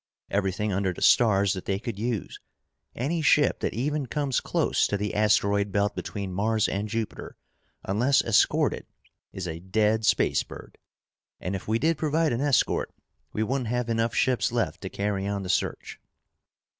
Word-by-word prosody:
Everything 100 Hz, +1 st, 0 dB
under 95 Hz, 0 st, 0 dB
the -, -, -10 dB
stars 100 Hz, -4 st, +4 dB
that 95 Hz, -, -6 dB
they 95 Hz, -, 0 dB
could 105 Hz, -1 st, -6 dB
use. 115 Hz, -3 st, -3 dB, 0.6 s
Any 160 Hz, +7 st, -1 dB
ship 150 Hz, -2 st, +3 dB
that -, -, -2 dB
even 145 Hz, +3 st, -1 dB
comes 140 Hz, -2 st, 0 dB
close -, -, +1 dB
to 100 Hz, -, -1 dB
the 105 Hz, +1 st, -3 dB
asteroid 100 Hz, -1 st, +2 dB
belt 100 Hz, +1 st, 0 dB
between 100 Hz, -3 st, -5 dB
Mars 110 Hz, +3 st, +1 dB
and 100 Hz, +2 st, -3 dB
Jupiter, 115 Hz, -1 st, -5 dB, 0.5 s
unless 120 Hz, +8 st, +2 dB
escorted, 115 Hz, -3 st, +2 dB, 0.4 s
is 95 Hz, -2 st, -5 dB
a 80 Hz, 0 st, -5 dB
dead 105 Hz, +4 st, +1 dB
space 105 Hz, -, +3 dB
bird. -, -, -11 dB, 0.6 s
And 95 Hz, +2 st, -3 dB
if 95 Hz, -, -7 dB
we 110 Hz, +1 st, +2 dB
did 160 Hz, +5 st, +1 dB
provide 155 Hz, -1 st, +1 dB
an 120 Hz, -, -1 dB
escort, 145 Hz, -4 st, +1 dB, 0.4 s
we 110 Hz, -, -1 dB
wouldn't 130 Hz, +1 st, -1 dB
have 120 Hz, +1 st, -1 dB
enough 115 Hz, 0 st, 0 dB
ships 130 Hz, -3 st, +2 dB
left 120 Hz, -1 st, -1 dB
to 95 Hz, -, -5 dB
carry 100 Hz, -1 st, -2 dB
on 100 Hz, -1 st, -2 dB
the 90 Hz, -, -6 dB
search." -, -, -2 dB
110 Hz, 170 wpm, -26 LUFS, 100-120 Hz, 0.6 s, stars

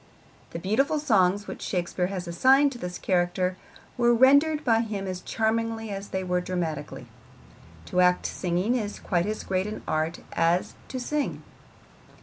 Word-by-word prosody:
The -, -, -6 dB
beautiful 250 Hz, -, +1 dB
songs 205 Hz, -8 st, +2 dB
which -, -, -8 dB
Shakespeare 180 Hz, 0 st, -1 dB
has 185 Hz, -2 st, -5 dB
assigned 265 Hz, +11 st, +4 dB
to 245 Hz, -, -9 dB
this 180 Hz, -2 st, -5 dB
character 180 Hz, 0 st, 0 dB, 0.4 s
were 240 Hz, 0 st, +4 dB
rendered 285 Hz, +5 st, +5 dB
by 225 Hz, -3 st, +4 dB
him 210 Hz, -4 st, -3 dB
as 185 Hz, -1 st, -4 dB
charmingly 225 Hz, 0 st, -1 dB
as 200 Hz, 0 st, -5 dB
they 190 Hz, 0 st, -3 dB
were 180 Hz, -1 st, 0 dB
dramatically. 175 Hz, -4 st, -4 dB, 0.8 s
To 180 Hz, -, +1 dB
act 180 Hz, 0 st, +3 dB
singing 180 Hz, +5 st, -1 dB
is 215 Hz, -5 st, -2 dB
quite 175 Hz, -1 st, -1 dB
as 215 Hz, 0 st, -3 dB
great 190 Hz, +1 st, -1 dB
an 215 Hz, -, -6 dB
art 160 Hz, +2 st, -1 dB
as 170 Hz, +2 st, +1 dB
to 260 Hz, -, -5 dB
sing. 295 Hz, +3 st, -2 dB
195 Hz, 155 wpm, -26 LUFS, 180-235 Hz, 0.8 s, rendered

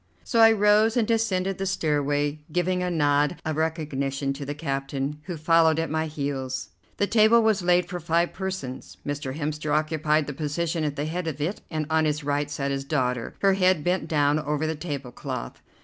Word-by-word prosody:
So 230 Hz, -, 0 dB
I 225 Hz, 0 st, +8 dB
rose 215 Hz, +2 st, +4 dB
and 225 Hz, -3 st, +2 dB
descended 195 Hz, -5 st, 0 dB
the 195 Hz, -, -1 dB
stairway, 145 Hz, -4 st, 0 dB
giving 180 Hz, +2 st, 0 dB
a 180 Hz, -, -1 dB
nod 145 Hz, -1 st, +2 dB
of 155 Hz, -1 st, -1 dB
recognition 140 Hz, -4 st, -1 dB
to 140 Hz, +1 st, -7 dB
the 145 Hz, -, -3 dB
captain, 140 Hz, 0 st, -3 dB
who 175 Hz, -3 st, -5 dB
followed 160 Hz, 0 st, +4 dB
at 165 Hz, -1 st, -1 dB
my 160 Hz, 0 st, 0 dB
heels. 135 Hz, -3 st, -4 dB, 0.3 s
The 205 Hz, -, +2 dB
table 220 Hz, +2 st, +5 dB
was 215 Hz, -3 st, +2 dB
laid 180 Hz, 0 st, +3 dB
for 180 Hz, -2 st, -5 dB
five 170 Hz, +1 st, +1 dB
persons. 190 Hz, -10 st, -5 dB
Mr. 145 Hz, -1 st, -4 dB
Hemster 150 Hz, 0 st, -3 dB
occupied 155 Hz, 0 st, +1 dB
the 145 Hz, -, -5 dB
position 160 Hz, +3 st, -2 dB
at 145 Hz, -1 st, -1 dB
the 145 Hz, -, -2 dB
head 170 Hz, +2 st, -3 dB
of 150 Hz, -3 st, -4 dB
it, 165 Hz, +8 st, -2 dB
and 155 Hz, -1 st, -2 dB
on 160 Hz, 0 st, +3 dB
his 150 Hz, 0 st, -1 dB
right 145 Hz, 0 st, -1 dB
sat 140 Hz, -1 st, -2 dB
his 135 Hz, 0 st, -2 dB
daughter, 125 Hz, -4 st, -1 dB
her 195 Hz, -1 st, +5 dB
head 185 Hz, -4 st, +3 dB
bent 180 Hz, -1 st, 0 dB
down 150 Hz, -1 st, +2 dB
over 150 Hz, 0 st, -1 dB
the 160 Hz, -, 0 dB
tablecloth. 140 Hz, -5 st, -6 dB
155 Hz, 195 wpm, -25 LUFS, 145-180 Hz, 0.3 s, I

